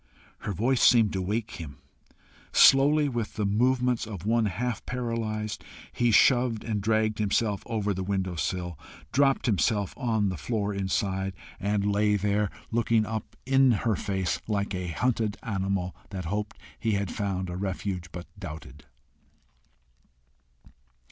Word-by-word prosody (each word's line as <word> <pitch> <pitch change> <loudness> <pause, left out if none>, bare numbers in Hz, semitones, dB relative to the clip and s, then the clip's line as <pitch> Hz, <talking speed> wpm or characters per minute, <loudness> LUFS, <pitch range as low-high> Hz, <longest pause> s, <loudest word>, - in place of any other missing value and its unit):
Her - - -4
voice 120 +7 +1
seemed 115 -4 +5
to 95 - -1
wake 110 +4 -2
him. 75 -4 -8 0.7
Slowly, 145 +2 +6
with 120 -5 -3
the 105 - -1
movements 125 +3 +1
of 100 -4 -7
one 115 0 +2
half 120 +5 -3
paralyzed, 115 -4 -3 0.3
he 120 -1 +2
shoved 120 0 +4
and 105 -2 -2
dragged 110 +1 +1
himself 105 0 +1
over 105 -4 -1
the 95 - -4
windowsill, 90 -3 -2 0.3
dropped 135 +2 +3
himself 105 -2 +1
on 110 -5 0
the 95 - -4
floor 105 - -2
inside, 95 0 -1 0.2
and 100 0 0
lay 105 +1 +2
there, 105 +1 +1 0.2
looking 115 -1 +2
up 110 0 -5
in 135 -1 +5
her 110 -3 +3
face 95 -2 -2
like 100 -2 -1
a 90 -1 -3
hunted 110 +4 0
animal, 95 -3 -2
that 95 -4 -5
hoped 105 +4 -3 0.2
he 110 -1 0
had 100 -3 -1
found 95 -3 -2
a 90 - -5
refuge, 95 -2 -3
but 90 0 -7
doubted. 75 -4 -9
105 Hz, 140 wpm, -27 LUFS, 95-115 Hz, 0.7 s, Slowly